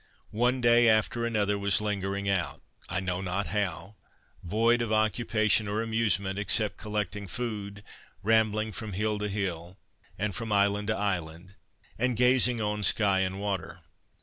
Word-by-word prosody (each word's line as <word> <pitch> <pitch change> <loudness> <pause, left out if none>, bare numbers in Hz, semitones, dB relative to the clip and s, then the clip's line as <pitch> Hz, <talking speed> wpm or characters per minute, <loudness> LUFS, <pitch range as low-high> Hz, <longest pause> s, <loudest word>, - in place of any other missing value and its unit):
One 125 +3 +1
day 120 0 +5
after 110 +2 +2
another 105 -3 0
was 100 0 +2
lingered 100 -1 -2
out, 90 -8 -1 0.3
I 95 - 0
know 90 0 -2
not 95 +1 -2
how, 100 -1 -3 0.5
void 115 +6 +2
of 115 -2 -2
occupation 110 0 +2
or 105 +2 -1
amusement, 105 -4 0
except 105 0 0
collecting 105 -2 -3
food, 105 -2 -5 0.4
rambling 110 0 +2
from 110 -2 -6
hill 105 +2 -1
to 105 0 -2
hill, 95 -3 -4 0.4
and 105 0 -2
from 110 +4 -4
island 100 0 +2
to 110 - 0
island, 90 -2 -3 0.5
and 125 -1 0
gazing 125 -1 +3
on 105 -1 -1
sky 100 -2 +3
and 95 +1 -1
water. 100 -4 -4
105 Hz, 150 wpm, -28 LUFS, 95-110 Hz, 0.5 s, day